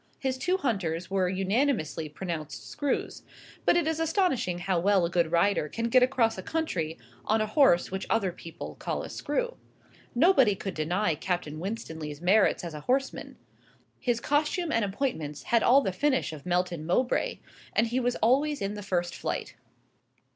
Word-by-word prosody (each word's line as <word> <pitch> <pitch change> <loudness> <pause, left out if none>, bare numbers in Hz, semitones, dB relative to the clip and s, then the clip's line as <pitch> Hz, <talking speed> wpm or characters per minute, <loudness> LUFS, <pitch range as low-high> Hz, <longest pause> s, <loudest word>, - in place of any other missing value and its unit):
His 265 -1 -2
two 365 +7 +1
hunters 185 - -2
were 190 -2 +2
unanimously 190 - 0
pronounced 160 -2 -6
screws; 290 -2 -2 0.4
but - - +5
it 345 - +2
is 320 0 -1
astonishing 325 - +1
how 180 0 0
well 195 0 +3
a 170 - -3
good 170 -2 +1
rider 170 -2 +2
can 230 +6 -2
get 255 +2 +5
across 235 -6 +2
country 180 - -2 0.3
on 220 +1 +2
a 215 - +1
horse 215 - +4
which 190 0 -4
other 200 -5 +1
people 165 -1 -9
call - - -3
a - - -7
screw. - - -2 0.6
Nobody 265 - +5
could 195 0 -5
deny 175 +5 0
Captain 155 -1 -3
Winstanley's 160 -6 -5
merits 190 +4 +3
as 170 -2 -5
a 150 - -6
horseman. 270 +1 -1 0.6
His 240 -2 0
costume 305 +6 0
and 230 -1 +2
appointments 175 - -3
had 235 -1 +2
all 265 +5 +6
the 190 - -1
finish 260 - +1
of 150 +2 -10
Melton 175 -2 0
Mowbray, 245 +8 +1 0.4
and 220 - +3
he 240 +3 0
was 245 -1 0
always 280 +5 +3
in 200 0 -2
the 210 - -6
first 175 -3 -1
flight. - - -4
200 Hz, 170 wpm, -28 LUFS, 175-260 Hz, 0.6 s, all